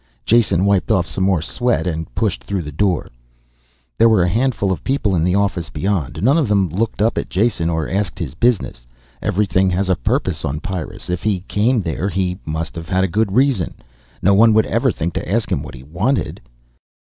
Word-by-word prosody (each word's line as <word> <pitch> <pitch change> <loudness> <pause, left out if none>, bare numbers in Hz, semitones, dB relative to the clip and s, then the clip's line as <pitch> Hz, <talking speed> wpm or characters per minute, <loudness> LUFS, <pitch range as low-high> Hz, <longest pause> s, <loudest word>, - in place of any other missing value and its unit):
Jason 105 -6 +3
wiped 100 -2 +2
off 90 -2 +2
some 95 - -3
more 95 -4 +2
sweat 120 +4 0
and 80 -5 -3
pushed - - -1
through 90 +9 -3
the 75 - -7
door. 90 +3 0 0.9
There 115 - +6
were 110 -5 +4
a 90 - +1
handful 115 -1 +1
of 90 - -3
people 130 -8 0
in 80 - +1
the 90 +2 +2
office 100 -4 0
beyond. 80 -2 -2
None 140 +8 +4
of 145 - +1
them 100 -3 +2
looked 105 +4 -1
up 115 - +1
at - - -5
Jason 95 -4 +1
or 80 -1 -1
asked 95 -3 -2
his 85 -7 -4
business. 90 - 0 0.3
Everything 95 -1 +1
has 95 +1 0
a 95 - +4
purpose - - -1
on 70 +2 -2
Pyrrus. 90 -2 -5
If 90 - -2
he 100 -4 0
came 110 +4 +1
there 85 +4 -2
he 95 -1 -2
must 80 -1 -3
have 80 0 -7
had 95 0 +2
a - - +2
good 105 +3 0
reason. 130 - +2 0.5
No 100 - +5
one 110 +2 +5
would 110 - +4
ever 120 +3 +1
think 85 -2 -3
to - - -4
ask 115 +1 0
him - - 0
what - - -9
he 65 - -11
wanted. 95 - -1
95 Hz, 210 wpm, -19 LUFS, 85-110 Hz, 0.9 s, There